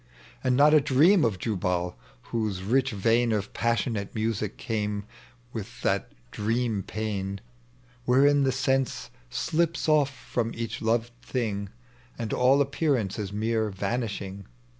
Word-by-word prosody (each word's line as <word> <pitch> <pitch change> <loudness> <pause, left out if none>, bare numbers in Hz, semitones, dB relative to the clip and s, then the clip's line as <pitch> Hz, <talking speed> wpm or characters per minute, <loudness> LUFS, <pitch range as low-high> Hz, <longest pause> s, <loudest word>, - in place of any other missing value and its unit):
And 125 -1 +2
not 150 +2 +6
a 155 - +7
dieam 155 +8 +5
ot 105 -5 0
Jubal, 90 -4 -1 0.4
whose 105 -5 -1
rich 130 +6 +2
vein 115 +2 +2
Of 105 -1 -2
passionate 115 -2 -1
musn, 110 -1 -1
came 105 -2 -2 0.5
with 115 +2 -7
that 100 -1 0 0.2
dream 115 0 0
pain. 100 -1 -3 0.7
Wherein 140 +3 +5
the 135 -1 +3
sen=ie 135 0 0 0.2
thps 165 0 0
off 150 -3 +4
from 120 -3 -3
each 115 -1 -4
lo? 115 +1 +2 0.2
thing. 110 -6 -2 0.5
And 115 -2 -3
all 130 +3 +4
appearance 135 - 0
is 100 -2 -3
mere 110 +1 0
vanishing. 100 -1 -3
115 Hz, 130 wpm, -27 LUFS, 100-130 Hz, 0.7 s, a